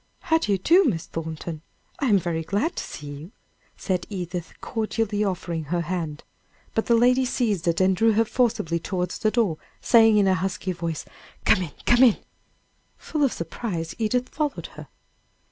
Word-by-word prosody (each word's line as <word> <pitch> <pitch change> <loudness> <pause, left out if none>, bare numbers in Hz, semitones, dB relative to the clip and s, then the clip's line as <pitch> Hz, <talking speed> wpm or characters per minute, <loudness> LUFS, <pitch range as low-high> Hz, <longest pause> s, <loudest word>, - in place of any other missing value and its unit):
"How 320 0 +2
do 210 - -1
you 195 - +3
do, 340 - +5
Miss 175 - 0
Thornton? 160 -1 -6 0.4
I 275 - +1
am 210 -4 +5
very 170 -3 -1
glad 205 - -1
to - - -3
see 150 - -8
you," 145 +5 -8 0.5
said 185 -3 -2
Edith, 180 -3 -5
cordially 220 -2 -1
offering 175 -5 -2
her 170 +4 -1
hand. 165 -3 -4 0.5
But 225 - -1
the 235 - +5
lady 250 +3 +4
seized 220 -9 0
it, 170 -1 +2
and 190 0 +4
drew 225 +4 +3
her 225 +2 +3
forcibly 215 -9 0
towards 180 +1 -3
the 215 - +2
door, 215 -9 +1 0.2
saying 225 -2 +5
in 200 -2 +4
a 190 - +4
husky 185 0 -2
voice: 170 -3 -4 0.4
"Come 185 - +5
in 165 -5 -4
come 240 +1 +5
in!" 245 -5 +6 0.8
Full 305 -2 -2
of 270 - +3
surprise, 170 -1 -4
Edith 245 +3 0
followed 295 -1 -3
her. - - -10
195 Hz, 180 wpm, -24 LUFS, 170-230 Hz, 0.8 s, in